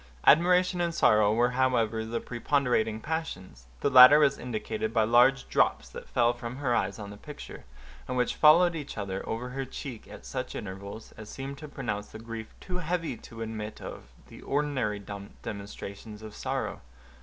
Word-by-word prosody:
Admiration 180 +2 +5
and 170 -1 -1
sorrow 105 -6 +4
were 120 +3 +2
however 120 -4 +1
the 115 +1 -3
preponderating 120 -3 0
passions; 95 - -5
the - - +2
latter 130 +3 +10
was 140 -2 +3
indicated 110 -2 -3
by 115 -1 +3
large 125 +4 +4
drops - - +2
that - - -10
fell 120 -1 +3
from 120 0 -7
her 130 -3 0
eyes 100 -3 0
on 100 -1 -7
the 105 - -10
picture, 150 +7 -10 0.4
and 125 - -2
which 125 - +1
followed 170 +3 +6
each 150 -7 -6
other 95 -2 -3
over 120 +3 -3
her 135 +2 -3
cheek 130 -2 -8
at - - -12
such - - -5
intervals, 100 +2 -7
as 110 -1 -10
seemed 135 +1 -7
to 150 - -8
pronounce 110 -8 -4
the - - -10
grief 115 0 -8
too 180 -1 -5
heavy 170 -4 -2
to 115 0 -9
admit 110 -1 -6
of - - -8 0.2
the - - -13
ordinary 135 -7 -1 0.5
demonstrations 105 0 -8
of 110 -1 -9
sorrow. - - -3
120 Hz, 175 wpm, -28 LUFS, 110-140 Hz, 0.5 s, latter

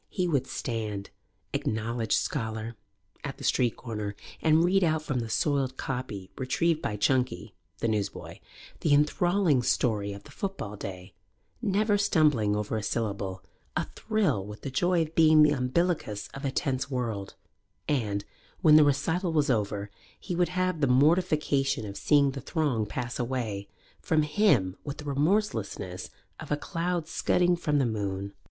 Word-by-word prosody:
He 185 -2 -1
would 140 -6 +1
stand, 110 -5 -4 0.4
acknowledged 110 +1 -1
scholar, 110 -3 -1 0.5
at 140 -2 -5
the - - -10
street 120 -3 +2
corner 105 -4 -5 0.3
and 160 +1 +4
read 190 +2 +3
out 160 -2 +1
from 135 -5 -1
the 115 -1 -4
soiled 135 -1 0
copy 115 -8 -4
retrieved 160 +5 +1
by 105 - -2
Chunky, 125 -3 0 0.2
the 115 - -1
newsboy, 105 -3 -3 0.4
the 145 - +3
enthralling 160 0 +3
story 105 -4 +1
of 100 0 -8
the 145 - -14
football 190 - -4
day, 95 -1 -8 0.5
never 205 -1 +2
stumbling 150 - +3
over 105 +1 -2
a - - -2
syllable, 100 -4 -3 0.3
athrill 215 - 0
with 105 +2 -9
the 135 - -5
joy 175 +5 +2
of 160 0 -8
being 155 -2 +6
the 150 - +5
umbilicus 125 - -1
of 135 +1 -6
a - - +1
tense 135 0 -1
world, 115 -7 -3 0.5
and, 105 -8 0 0.4
when 155 -4 +7
the 155 - +8
recital 165 +5 +1
was 150 -3 +2
over, 105 -3 -1 0.3
he 180 - -4
would 175 0 +2
have 185 -2 -1
the 140 - +4
mortification 145 -2 +2
of 100 -1 -7
seeing 140 +5 +3
the 135 0 -6
throng 135 -9 0
pass 120 +3 -4
away 115 -5 -2 0.3
from 155 -1 +2
him 150 - +2
with 145 0 -5
the 150 - -8
remorselessness 140 - -1 0.3
of - - -8
a 150 - +2
cloud 170 +1 -2
scudding 180 0 +2
from 150 -4 0
the 135 - +3
moon. 100 -3 -3
135 Hz, 155 wpm, -28 LUFS, 110-160 Hz, 0.5 s, the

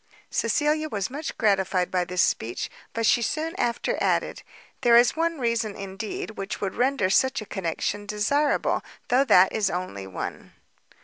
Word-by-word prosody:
Cecilia 310 +1 +1
was 200 -2 -3
much 295 +4 -5
gratified 190 -4 +1
by 180 -1 +1
this 180 0 +1
speech; 115 +2 -1 0.2
but 230 0 -1
she 235 - +4
soon 315 +7 -2
after 235 0 -1
added, - - 0 0.4
"There 235 -1 +6
is 240 0 +5
one 330 0 0
reason, 230 -4 -1
indeed, 200 +2 -5
which 195 -2 -5
would 195 -2 -2
render 250 -7 +1
such 260 +5 +3
a 215 - -7
connection 195 +2 -3
desirable, 280 +8 +1 0.3
though 260 +3 +4
that 185 -7 +5
is 210 -3 +1
only 135 - -4
one." 95 - -6
215 Hz, 160 wpm, -25 LUFS, 190-265 Hz, 0.4 s, There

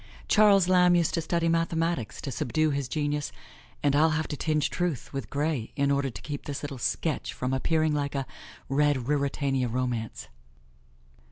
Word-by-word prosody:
Charles 200 -4 +5
Lamb 180 -1 +5
used 170 -2 +2
to 165 - +1
study 165 +1 0
mathematics 165 -5 0
to 140 - -4
subdue 155 +6 0
his 140 -2 -2
genius, 145 +1 -2 0.5
and 145 -1 +3
I'll 155 +2 +5
have 160 - -2
to 150 - -2
tinge 155 0 0
truth 175 -9 -2
with 135 -1 -4
gray 145 -5 -2
in 140 -1 +2
order 140 -1 +1
to 115 - -9
keep 145 -1 -5
this 145 -1 -4
little 140 -3 -5
sketch 140 +5 -1
from 125 +1 -2
appearing 155 +3 +1
like 145 -1 -1
a 135 -1 -1 0.4
red 140 -2 +2
Ruritania 140 -2 0
romance. 120 -2 -3
145 Hz, 170 wpm, -27 LUFS, 135-160 Hz, 0.5 s, Charles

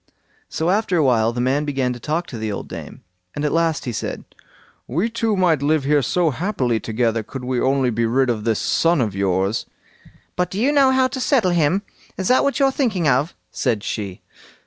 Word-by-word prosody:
So 165 +3 0
after 200 -3 +1
a 160 - +3
while 115 -4 +3
the 120 - -5
man 130 +4 +1
began 135 -4 -1
to 120 - -9
talk 155 +7 -2
to 120 - -8
the 110 -1 -2
old 100 - -5
dame, - - -9 0.3
and 145 - -2
at 150 - +1
last 165 -2 0
he 125 - -2
said: 110 - -4 0.6
"We 175 - -1
two 225 -2 0
might 170 -6 +2
live 150 0 +2
here 145 +1 +3
so 165 +5 +1
happily 130 - -1
together, 115 +1 0
could 125 +4 -8
we 125 -1 -1
only 130 -1 +2
be 115 +1 0
rid 130 +2 +2
of 110 -3 -3
this 110 -2 +1
son 165 -1 +2
of 110 -6 0
yours." 95 +2 0 0.7
"But 180 0 0
do 195 - -4
you 260 +6 +3
know 280 -2 +5
how 260 0 +3
to 260 - -5
settle 245 -8 +2
him? 175 +4 +2 0.3
Is 190 - -1
that 255 - +4
what 280 0 0
you're 275 -1 +3
thinking 220 - 0
of?" 140 +5 +1 0.2
said 115 -6 -1
she. 100 -6 -5
145 Hz, 215 wpm, -21 LUFS, 120-180 Hz, 0.7 s, know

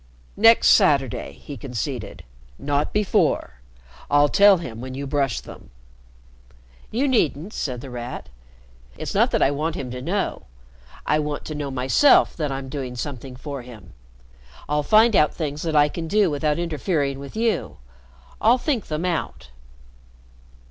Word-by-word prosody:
"Next 225 +2 +6
Saturday," 140 - +3
he 70 - -10
conceded. 125 -1 -5 0.3
"Not 145 +1 -1
before. 185 - 0 0.5
I'll 145 0 +4
tell 200 +2 +6
him 120 -9 -7
when 130 0 -7
you 140 +1 -5
brush 135 -5 0
them." - - -13 1.2
"You 255 +6 0
needn't," 195 - 0
said 125 -4 -4
The 135 - -9
Rat. 120 - -6 0.7
"It's - - -5
not - - +3
that - - +1
I 135 - +3
want 155 +3 -2
him 125 -2 -5
to 125 0 -6
know. 190 +8 -2 0.6
I 150 - +2
want 150 -1 -4
to 155 - -5
know 145 -2 -4
myself 130 - +4
that 150 -4 -2
I'm 135 0 -5
doing 130 -2 -5
something 130 0 -6
for 140 +1 -7
him. 120 -5 -13 0.7
I'll 150 0 +1
find 220 +7 +4
out 150 - +3
things 150 -2 -4
that 160 -2 -2
I 145 0 +6
can 165 +2 -5
do 200 -1 +2
without 150 +1 0
interfering 155 -4 -1
with 140 +6 -9
you. 225 -1 -1 0.6
I'll 235 +4 +5
think 255 - -2
them 155 +3 -3
out." 170 - -3
145 Hz, 155 wpm, -23 LUFS, 135-175 Hz, 1.2 s, Next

